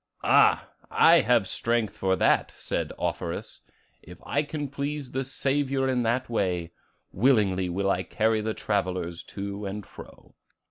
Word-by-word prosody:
'Ah, - - +4 0.2
I - - +6
have 115 -4 +3
strength 115 -3 -1
for 95 -3 +1
that!' - - +2
said - - -3
Offerus. - - -4 0.4
'If 90 +2 -13
I 145 - +1
can 145 -1 -4
please 140 0 -4
the 135 +1 -1
Saviour 135 0 0
in 130 -2 +1
that 120 +3 0
way, 90 -7 -1 0.4
willingly 100 -5 +2
will 100 +2 0
I 90 - 0
carry 110 +3 0
the 110 0 -2
travellers 90 -4 -2
to 100 0 -5
and 100 0 -6
fro. - - -14
110 Hz, 145 wpm, -26 LUFS, 95-130 Hz, 0.4 s, I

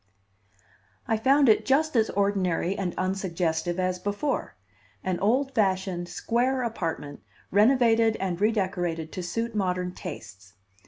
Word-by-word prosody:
I 225 - +2
found 270 +5 +4
it 220 - +5
just 300 +2 +2
as 225 -1 +3
ordinary 195 -2 0
and 185 -3 -3
unsuggestive 175 -3 -1
as 185 0 0
before; 205 +9 -2 0.5
an 185 -2 -1
old 260 +7 +1
fashioned, 190 -5 0
square 245 +8 0
apartment 165 -10 -4 0.3
renovated 225 +1 +4
and 185 -1 -2
redecorated 180 -7 0
to 185 - -5
suit 230 +6 -3
modern 180 -3 -1
tastes. 100 - -9
195 Hz, 120 wpm, -26 LUFS, 175-225 Hz, 0.5 s, it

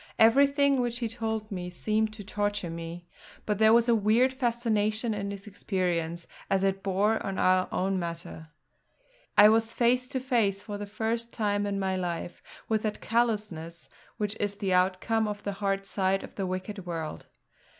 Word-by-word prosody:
Everything 280 +3 +5
which 240 -1 -1
he 240 -1 -1
told 220 -1 -3
me 180 -2 -4
seemed 215 +4 0
to 215 -1 -8
torture 205 -3 -2
me; 170 +1 -7 0.4
but 210 -2 -1
there 220 0 +6
was 235 +1 +5
a 235 - +5
weird 230 +4 +3
fascination 230 -3 0
in 200 -1 -3
his 200 -1 -7
experience 175 -5 -2 0.2
as 195 0 +2
it 195 0 +1
bore 200 +3 +1
on 195 -1 -3
our 185 0 +3
own 190 0 0
matter. 170 -1 -6 0.9
I 205 - +10
was 225 +1 +2
face 250 +2 +2
to 265 0 -2
face, 230 -7 +1
for 205 0 -7
the 205 - -5
first 230 +3 -2
time 205 -2 0
in 200 -1 -1
my 190 -1 0
life, 175 -1 -4 0.3
with 220 -1 +1
that 215 -1 -2
callousness 210 -8 -1 0.3
which 210 -1 -2
is 205 -1 -1
the 195 -2 -1
outcome 190 +5 +2
of 205 -1 -5
the 200 - -2
hard 195 -1 0
side 195 -1 0
of - - -10
the 195 -2 -3
wicked 185 +1 -5
world. 160 - -5
205 Hz, 175 wpm, -28 LUFS, 185-225 Hz, 0.9 s, I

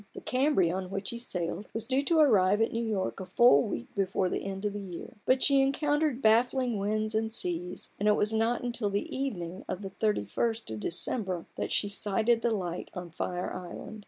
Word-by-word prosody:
The - - -7
Cambria, 255 - +2
on 185 -1 -4
which 195 0 -3
he 235 - -5
sailed, 180 -3 -3
was 225 0 -2
due 260 +3 +1
to 335 - +3
arrive 205 -9 +5
at 225 - +2
New 230 +1 -1
York 205 -5 -2
a 190 - -5
full 185 -6 +6
week 120 - -4
before 190 -1 0
the - - -2
end 195 +1 -4
of 205 - 0
the 205 - -4
year; 185 -1 -8
but 255 0 +4
she 275 -1 +5
encountered 290 0 +1
baffling 240 +1 +3
winds 215 +2 -1
and 220 0 0
seas, 180 -4 -3
and 205 - +1
it 210 - +5
was 210 +1 +1
not 225 +3 +1
till 215 -4 -1
the 200 +1 -2
evening 185 -10 -4
of 185 +2 -4
the 195 - -5
thirty 210 - 0
first 225 - -2
of 110 - -4
December 185 - -2
that - - -3
she 205 - +2
sighted 215 +3 +1
the 235 - +2
light 180 -6 -3
on 180 -2 -6
Fire 180 +2 -3
Island. 185 +4 -7
210 Hz, 215 wpm, -29 LUFS, 185-235 Hz, -, full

